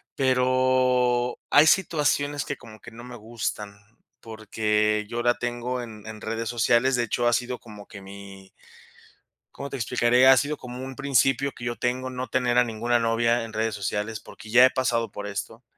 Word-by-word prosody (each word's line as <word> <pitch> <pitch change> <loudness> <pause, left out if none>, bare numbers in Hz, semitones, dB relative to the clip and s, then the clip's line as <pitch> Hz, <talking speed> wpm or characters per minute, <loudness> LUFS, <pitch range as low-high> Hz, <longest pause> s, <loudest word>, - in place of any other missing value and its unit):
Pero 125 -1 +2
hay 150 +2 +6
situaciones 145 -5 +1
que 140 - -5
como 110 -3 -14
que 120 - -13
no 115 +1 -12
me 125 0 -10
gustan, 110 -2 -5 0.4
porque 105 -1 -1
yo 120 0 -3
la 120 0 +4
tengo 120 +1 -3
en 110 -3 -10
en 110 -1 -9
redes 115 +1 -4
sociales. 120 +2 +2
De 120 - +1
hecho, 120 +2 -1
ha 120 - +3
sido 125 +1 -1
como 105 -3 -13
que 105 -3 -11
mi 95 0 -12 1.0
¿cómo 140 - -7
te - - -6
explicaré? 120 +1 +2
Ha 135 - +8
sido 145 +3 -1
como 125 0 -8
un 130 0 -7
principio 135 0 +1
que 120 - -13
yo 120 -1 -3
tengo, 130 +2 -2
no 130 0 -5
tener 125 +1 0
a 125 - +6
ninguna 120 +1 -1
novia 115 +1 +1
en 115 0 -9
redes 110 0 -1
sociales, 105 +2 -3
porque 110 -3 -14
ya 125 +3 +7
he 130 - +3
pasado 115 -4 -1
por 105 0 -7
esto. 110 +4 -6
120 Hz, 185 wpm, -25 LUFS, 110-130 Hz, 1.0 s, Ha